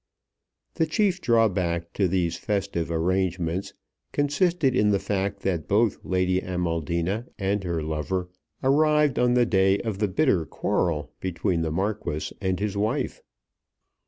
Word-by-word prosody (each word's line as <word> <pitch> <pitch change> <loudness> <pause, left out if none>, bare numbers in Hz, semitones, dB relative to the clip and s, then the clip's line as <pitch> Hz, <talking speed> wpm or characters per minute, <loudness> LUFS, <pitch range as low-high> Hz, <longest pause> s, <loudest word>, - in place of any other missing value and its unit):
The 160 - +1
chief 190 +2 +1
drawback 90 -7 +1
to 95 - +2
these 85 -2 0
festive 95 -5 -2
arrangements 90 +2 -1 0.4
consisted 145 -1 +1
in 105 -4 +3
the 100 - +3
fact 100 0 -2
that 85 -5 -1
both 105 +1 +2
Lady 95 0 +1
Amaldina 90 - -2
and 100 -1 -1
her 85 -3 -2
lover 80 +4 -2 0.4
arrived 150 0 +3
on 125 0 +3
the 120 -1 +4
day 95 -2 +3
of 110 -4 -4
the 105 - +2
bitter 95 - +2
quarrel 75 -4 -1
between 90 -1 -1
the 80 - -1
Marquis 95 -3 -2
and 95 -2 0
his 105 0 -2
wife. 105 +2 -1
95 Hz, 135 wpm, -25 LUFS, 85-110 Hz, 0.4 s, the